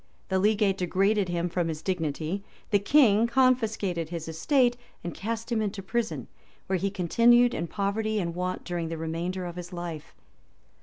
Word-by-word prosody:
The 190 -1 +2
legate 205 -1 +2
degraded 195 +2 +1
him 175 0 0
from 175 -1 -1
his 155 -1 -4
dignity; 170 +1 -2 0.3
the 205 - +5
king 225 -1 +5
confiscated 225 -9 +1
his 170 -2 -5
estate, 245 - +2 0.3
and 170 -1 -4
cast 230 +3 -4
him 225 -2 +1
into 200 -2 -3
prison, 225 +3 -2 0.4
where 190 -1 0
he 200 - 0
continued 235 +6 +4
in 170 - -2
poverty 215 +3 -1
and 170 -3 -2
want 180 +1 -3
during 170 -2 -3
the 165 - -4
remainder 170 +3 -3
of 175 0 -6
his 180 0 -7
life. 175 -4 -6
190 Hz, 165 wpm, -27 LUFS, 170-220 Hz, 0.4 s, the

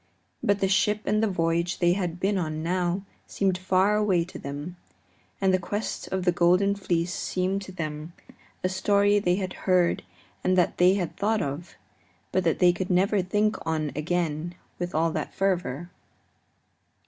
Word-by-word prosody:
But 200 0 +1
the 195 - +3
ship 210 +2 +2
and 215 +1 +2
the 220 - +3
voyage 170 -1 0
they 175 -1 +3
had 180 -3 -3
been 195 +2 +1
on 155 -4 -2
now 180 +2 -1 0.2
seemed 190 -2 0
far 190 +2 +2
away 195 -5 +2
to 180 - -10
them, 145 +6 -6 0.6
and 190 -1 +2
the 185 - +3
Quest 205 +4 -4
of 190 -1 -2
the 180 - +5
Golden 180 +3 +3
Fleece 175 -3 -1
seemed 190 +2 -1
to 190 - -9
them 155 -2 -5 0.5
a - - +3
story 200 +2 +3
they 180 -3 +2
had 185 -1 -3 0.2
heard 180 -2 +3 0.4
and 185 0 +2
that 180 - +2
they 180 +2 +6
had 180 -4 -3
thought 215 -1 +1
of, 145 +5 -5 0.6
but 185 - +1
that 165 - +2
they 180 -1 +5
could 185 +1 -4
never 195 +2 +3
think 210 +4 +1
on 155 -2 -1
again 165 +1 -2 0.2
with 175 -2 -3
all 165 +1 +2
that - - -4
fervor. 175 -4 -1
180 Hz, 170 wpm, -26 LUFS, 170-195 Hz, 0.6 s, they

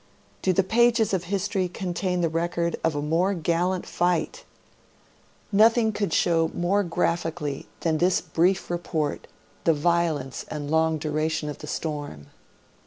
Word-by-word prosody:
Do 190 - +2
the 190 +2 +3
pages 230 +1 +3
of 180 -2 0
history 195 0 -1
contain 180 0 -2
the 170 - +2
record 170 +1 -1
of 165 -2 +1
a 145 - -2
more 175 +6 +1
gallant 175 +2 0
fight! 180 - -1 1.1
Nothing 220 +2 +5
could 205 -4 -2
show 165 -1 +2
more 195 +4 +1
graphically 165 -4 -2
than 160 -2 +1
this 180 +1 +3
brief 180 +2 0
report, 160 -4 -2 0.4
the 165 - +4
violence 155 -4 0
and 145 -1 -5
long 160 0 +2
duration 155 0 -1
of 145 - -7
the 150 - -8
storm. 145 - -4
170 Hz, 140 wpm, -25 LUFS, 155-185 Hz, 1.1 s, Nothing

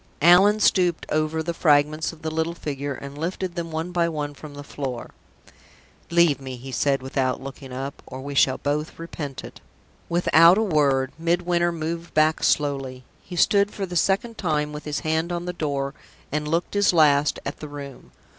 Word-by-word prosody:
Allan 190 +5 +6
stooped 180 -5 +2
over 155 +1 0
the 170 +1 -2
fragments 155 -1 +2
of 160 -1 -16
the 160 - -2
little 160 +1 -1
figure, 140 -3 -4
and 140 +1 -9
lifted 175 +3 -3
them 170 -1 -4
one 160 +2 -4
by 170 -1 +1
one 150 -2 -4
from 145 0 -11
the 145 - -8
floor. 135 -4 -6 1.0
"Leave 170 -5 +3
me," 130 -1 -6
he 130 +2 -9
said, 135 0 +1
without 130 -1 -1
looking 135 0 -9
up, 135 +2 -6
"or 130 - -8
we 140 +2 -6
shall 130 -1 +3
both 150 +2 -2
repent 150 -4 -6
it." - - -11 0.5
Without 170 +1 +6
a 220 - +2
word, 140 -8 +2
Midwinter 175 +1 +1
moved 170 +1 -5
back 155 +1 +3
slowly. 135 -3 0 0.2
He 180 - -9
stood 200 +3 +3
for 200 -1 -4
the 180 -1 -7
second 200 +6 +1
time 150 -4 -1
with 150 - -7
his 150 0 -3
hand 160 +1 -1
on 175 0 -3
the 180 - -3
door, 140 -4 -2 0.4
and 150 0 -2
looked 165 +3 -1
his 205 -2 +3
last 150 -3 +4
at 140 - -5
the 155 - -7
room. 140 -2 -10
155 Hz, 185 wpm, -24 LUFS, 140-170 Hz, 1.0 s, Allan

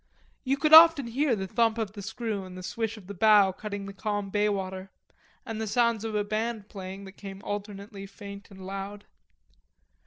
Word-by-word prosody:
You 275 0 +1
could 305 +2 +2
often 325 -4 +10
hear 255 +2 +1
the 190 -2 -3
thump 225 +3 +1
of 220 -3 -2
the 205 - -8
screw 220 -1 -4
and 185 -1 -10
the 185 - -8
swish 225 +3 -3
of 205 - -13
the 200 - -7
bow 205 0 +5
cutting 205 +1 -6
the 200 - -8
calm 205 0 -3
baywater, 195 -2 -1 0.6
and 220 -1 -4
the 220 - -2
sound 235 0 +2
of 220 -1 -3
a 210 - +1
band 215 0 -3
playing, 190 0 -7
that 190 - -10
came 195 -1 -9
alternately 200 0 -6
faint 200 0 -10
and 190 -1 -11
loud. 195 +1 -6
205 Hz, 190 wpm, -28 LUFS, 195-225 Hz, 0.6 s, often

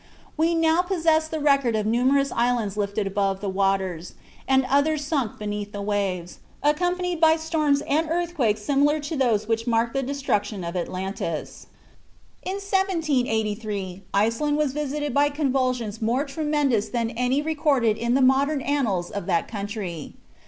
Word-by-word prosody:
We 330 +2 +2
now 325 +1 +3
possess 325 -4 +1
the 315 0 -4
record 275 -5 +3
of 215 -1 0
numerous 260 +5 +2
islands 235 -4 0
lifted 205 0 -1
above 195 -1 0
the 205 - -4
waters, 190 -3 -1 0.3
and 265 0 +3
others 285 +2 +2
sunk 275 -7 -1
beneath 205 -1 -4
the 205 - -4
waves, 195 -4 -2 0.2
accompanied 355 +3 0
by 320 -1 +6
storms 310 -3 +1
and 310 +2 0
earthquakes 320 -11 0
similar 290 +4 +2
to 295 +3 -4
those 230 -6 +1
which 225 +1 -1
marked 230 0 +1
the 270 - 0
destruction 220 -8 -2
of 170 +1 -5
Atlantis. 185 -2 -4 0.7
In 375 - -4
1783 235 - -1
Iceland 230 +9 +1
was 300 -3 0
visited 295 0 -2
by 285 +1 +3
convulsions 255 -7 -1
more 240 +6 +1
tremendous 285 -6 0
than 235 -2 -1
any 250 +4 0
recorded 290 -8 +2
in 235 +2 0
the 270 - +3
modern 275 +3 +3
annals 225 -12 0
of 200 - -5
that 170 -3 +1
country. 200 -7 -5
255 Hz, 150 wpm, -24 LUFS, 210-295 Hz, 0.7 s, by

